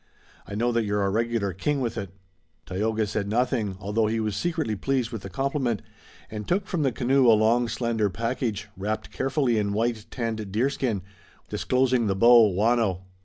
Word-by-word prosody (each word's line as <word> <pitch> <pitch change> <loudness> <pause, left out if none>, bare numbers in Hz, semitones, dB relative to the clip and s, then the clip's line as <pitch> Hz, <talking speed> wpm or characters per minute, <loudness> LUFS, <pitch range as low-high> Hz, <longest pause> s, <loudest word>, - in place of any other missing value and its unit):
I 100 - -6
know 120 +3 +1
that 115 -1 +1
you're 105 -1 0
a 100 - 0
regular 115 -2 0
king 140 - -1
with 120 -4 -2
it." 100 -2 -4 0.6
Tayoga 110 +4 -1
said 105 0 -2
nothing, 110 -3 0
although 105 +2 0
he 115 +1 0
was 105 -2 -1
secretly 160 - -1
pleased 125 +2 -1
with 115 -4 -5
the 95 - -7
compliment, 135 - -1 0.5
and 105 -1 -6
took 195 +2 +1
from 175 -3 -2
the 135 -3 +2
canoe 130 +2 +2
a 110 -2 +7
long 115 +3 +3
slender 115 -3 0
package, 115 0 -2
wrapped 105 +3 -3
carefully 135 -4 +1
in 100 -1 -1
white, 115 0 -1
tanned 110 -4 -4
deerskin, 115 -3 0
which - - -23
he 100 - -25
unrolled, - - -30
disclosing 125 -3 +1
the 95 - +1
bow, 115 +1 +7
waano. 105 -1 +1
115 Hz, 190 wpm, -26 LUFS, 105-125 Hz, 0.6 s, a